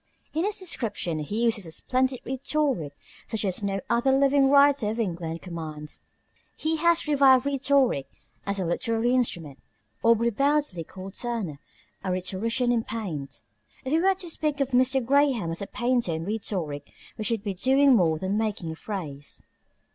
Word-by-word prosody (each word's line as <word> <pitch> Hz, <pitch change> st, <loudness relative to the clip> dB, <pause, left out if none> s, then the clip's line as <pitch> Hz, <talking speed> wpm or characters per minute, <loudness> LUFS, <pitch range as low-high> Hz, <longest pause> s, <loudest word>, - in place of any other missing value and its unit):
In 320 Hz, +4 st, 0 dB
his 415 Hz, 0 st, +1 dB
descriptions 210 Hz, -, -2 dB
he 220 Hz, +3 st, -1 dB
uses 220 Hz, -6 st, 0 dB
a -, -, -8 dB
splendid 255 Hz, +7 st, 0 dB
rhetoric 265 Hz, -, -1 dB, 0.3 s
such 220 Hz, -1 st, 0 dB
as 190 Hz, 0 st, -1 dB
no 195 Hz, -1 st, -1 dB
other 240 Hz, +3 st, +2 dB
living 275 Hz, 0 st, +4 dB
writer 280 Hz, -5 st, +5 dB
of 220 Hz, +2 st, -3 dB
English 170 Hz, -5 st, -3 dB
commands. 155 Hz, -4 st, -7 dB, 0.6 s
He 320 Hz, +1 st, 0 dB
has 340 Hz, 0 st, +3 dB
revived 270 Hz, -3 st, +5 dB
rhetoric 275 Hz, -, +2 dB, 0.4 s
as 200 Hz, 0 st, -2 dB
a 185 Hz, -, -1 dB
literary 225 Hz, +7 st, 0 dB
instrument. 170 Hz, -, 0 dB, 0.4 s
Aubrey 230 Hz, +1 st, +3 dB
Beardsley 275 Hz, -, +1 dB
called 190 Hz, +3 st, -10 dB
Turner 220 Hz, -, -3 dB, 0.4 s
a 190 Hz, -, -2 dB
rhetorician 225 Hz, +7 st, 0 dB
in 235 Hz, -2 st, +1 dB
paint. 180 Hz, -13 st, -5 dB, 0.4 s
If 260 Hz, -, -2 dB
we 320 Hz, -, +4 dB
were 380 Hz, +2 st, +3 dB
to 365 Hz, -2 st, -4 dB
speak 300 Hz, -2 st, -1 dB
of 275 Hz, -1 st, 0 dB
Mr. 255 Hz, 0 st, +3 dB
Graham 270 Hz, -, +2 dB
as 165 Hz, -, -5 dB
a 200 Hz, -, -4 dB
painter 240 Hz, -7 st, 0 dB
in 160 Hz, +1 st, -4 dB
rhetoric, 180 Hz, -9 st, -3 dB, 0.2 s
we 220 Hz, -, -5 dB
should 220 Hz, -1 st, 0 dB
be 205 Hz, -3 st, -2 dB
doing 265 Hz, +7 st, +4 dB
more 165 Hz, -6 st, +3 dB
than 190 Hz, +5 st, -1 dB
making 205 Hz, -7 st, -2 dB
a -, -, -6 dB
phrase. 155 Hz, -8 st, -7 dB
230 Hz, 165 wpm, -26 LUFS, 180-270 Hz, 0.6 s, writer